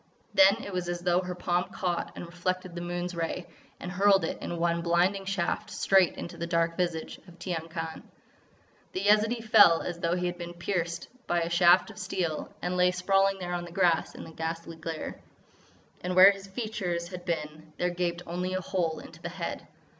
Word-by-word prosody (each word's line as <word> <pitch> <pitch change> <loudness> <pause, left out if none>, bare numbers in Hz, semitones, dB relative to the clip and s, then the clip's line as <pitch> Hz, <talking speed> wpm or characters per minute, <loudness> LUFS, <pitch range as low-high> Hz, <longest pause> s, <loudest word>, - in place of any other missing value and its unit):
Then 195 +4 +6
it 200 - -7
was 180 -1 -2
as 175 0 -3
though 175 0 +3
her 180 -1 -5
palm 180 0 0
caught 175 -1 -3
and - - -6
reflected 180 +1 -3
the 175 - -5
moon's 175 +1 -3
ray, 170 +1 -3 0.3
and 180 - -6
hurled 195 -1 +4
it - - -4
in 175 - -4
one 170 0 +1
blinding 180 +3 +2
shaft 195 +2 -1
straight 190 -1 +3
into 170 - -7
the 170 - -3
dark 170 0 +1
visage 170 -3 -2
of 175 -1 -15
Tiyang 170 -3 -4
Khan. 165 -1 -5 0.9
The 185 - -2
Yezidee 215 +3 +3
fell 205 -7 +6
as 175 -1 -4
though 170 +1 +1
he 180 0 -1
had 175 0 -3
been 175 0 -6
pierced 170 -2 -2 0.2
by 175 0 +1
a 165 +1 -2
shaft 175 +4 +5
of 210 - -12
steel, 180 -5 -2
and 180 +1 -1
lay 180 0 +5
sprawling 195 +2 +2
there 180 -2 -4
on 175 0 -2
the 175 - -10
grass 175 -2 +2
in - - -8
the 165 - -10
ghastly 165 +1 -5
glare. 160 0 -6 0.8
And 180 0 -2
where 190 +2 +10
his 195 0 -9
features 190 -5 -3
had 180 -1 -7
been 155 -1 -4
there 180 0 0
gaped 175 0 -2
only 180 +2 -3
a - - 0
hole 175 -3 -1
into - - -12
the - - -4
head. - - -5
175 Hz, 200 wpm, -28 LUFS, 170-185 Hz, 0.9 s, where